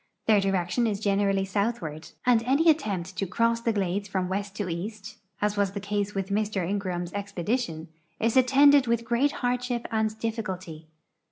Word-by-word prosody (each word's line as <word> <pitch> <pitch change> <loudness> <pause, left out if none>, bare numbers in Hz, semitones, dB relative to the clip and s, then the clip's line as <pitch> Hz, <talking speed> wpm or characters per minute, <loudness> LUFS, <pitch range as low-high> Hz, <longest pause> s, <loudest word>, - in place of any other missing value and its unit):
Their 215 -2 +5
direction 195 +4 +1
is 205 -2 -1
generally 200 -1 +1
southward, 190 -7 -2 0.2
and 245 -2 +4
any 280 +7 +4
attempt 195 - -3
to 195 - -1
cross 230 +4 +1
the 230 - +1
glades 200 -1 -1
from 185 -2 -1
west 200 +1 -3
to 205 -3 -3
east, 205 +5 -6 0.2
as 210 0 +1
was 200 -1 +1
the 200 - -3
case 205 0 -2
with 195 0 -2
Mr 205 -3 0
Ingraham's 180 -3 -3
expedition, 200 -3 -2 0.3
is 230 +2 +1
attended 275 +1 +6
with 235 0 0
great 245 +5 +2
hardship 245 -2 -2
and 220 -1 0
difficulty. 185 -8 -5
205 Hz, 165 wpm, -27 LUFS, 190-230 Hz, 0.3 s, attended